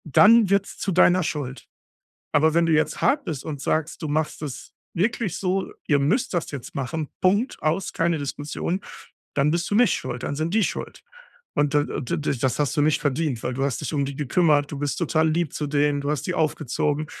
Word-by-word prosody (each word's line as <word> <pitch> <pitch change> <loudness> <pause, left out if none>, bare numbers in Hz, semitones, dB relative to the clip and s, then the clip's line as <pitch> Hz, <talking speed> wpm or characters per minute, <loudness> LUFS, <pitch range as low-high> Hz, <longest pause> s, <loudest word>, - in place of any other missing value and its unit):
Dann 210 - +6
wird's 200 0 +1
zu 195 - -2
deiner 180 0 +5
Schuld. 140 -5 -4 0.7
Aber 155 +2 +4
wenn 170 0 +3
du 165 - +2
jetzt 155 0 +1
hart 285 0 +2
bist 155 -7 -4
und 145 -3 -5
sagst, 155 +2 -1
du 155 - -3
machst 150 +1 -1
es 145 -4 -7 0.2
wirklich 200 0 0
so, 190 0 -1 0.2
ihr 145 -2 +3
müsst 195 - +1
das 175 -3 -1
jetzt 135 -5 -8
machen, 140 +3 -3
Punkt, 205 +8 +1
aus, 165 +4 -1
keine 170 -1 +1
Diskussion, 145 +5 -3 0.5
dann 140 +1 +2
bist 170 +1 -1
du - - 0
nicht 240 +2 +5
schuld, 120 0 -5
dann 140 - -3
sind 160 +5 -2
die 220 - +4
schuld. - - -4 0.5
Und 145 0 +1
d 145 0 +4 0.2
d 125 - -2
d 145 -2 -1
das 125 0 0
hast 150 +1 0
du 145 - +3
nicht 155 0 +2
verdient, 145 -4 -1
weil 125 - -2
du 135 +2 -1
hast 140 -3 -1
dich - - -4
um 145 -2 +1
die 140 0 -4
gekümmert, 145 +1 +2
du 145 - -5
bist 145 0 -2
total 160 -1 +2
lieb 165 -1 0
zu 150 - -3
denen, 145 0 +1
du 145 +1 -2
hast 150 -2 -1
die 185 - -1
aufgezogen 150 -1 0
155 Hz, 215 wpm, -24 LUFS, 145-175 Hz, 0.7 s, Dann